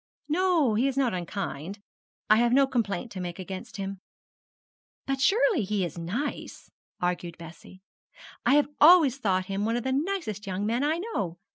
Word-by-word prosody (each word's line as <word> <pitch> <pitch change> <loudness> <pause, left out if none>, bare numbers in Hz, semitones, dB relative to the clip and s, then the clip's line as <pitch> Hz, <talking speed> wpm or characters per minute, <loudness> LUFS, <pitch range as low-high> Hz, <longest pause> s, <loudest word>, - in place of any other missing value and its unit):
'No, 330 -6 +2
he 235 +6 +2
is 275 -1 -2
not 260 -5 +2
unkind. 180 -1 -5 0.5
I 215 - +6
have 240 +1 +3
no 275 +1 +6
complaint 235 -3 -2
to 190 - -7
make 175 -1 -5
against 190 +1 -7
him.' 195 -1 -5 1.1
'But 270 -1 -2
surely 410 - +3
he 200 -2 -1
is 170 0 -7
nice,' 220 - -5 0.3
argued 175 -1 -2
Bessie; 170 +3 -13 0.6
'I - - +3
have 295 -1 +3
always 300 -5 +7
thought 185 -6 0
him 195 +1 -3
one 225 +2 0
of 240 - -2
the 265 - -1
nicest 275 - -2
young 190 +2 -2
men 235 +5 0
I 310 +3 +1
know. 210 - -3
220 Hz, 170 wpm, -27 LUFS, 185-275 Hz, 1.1 s, always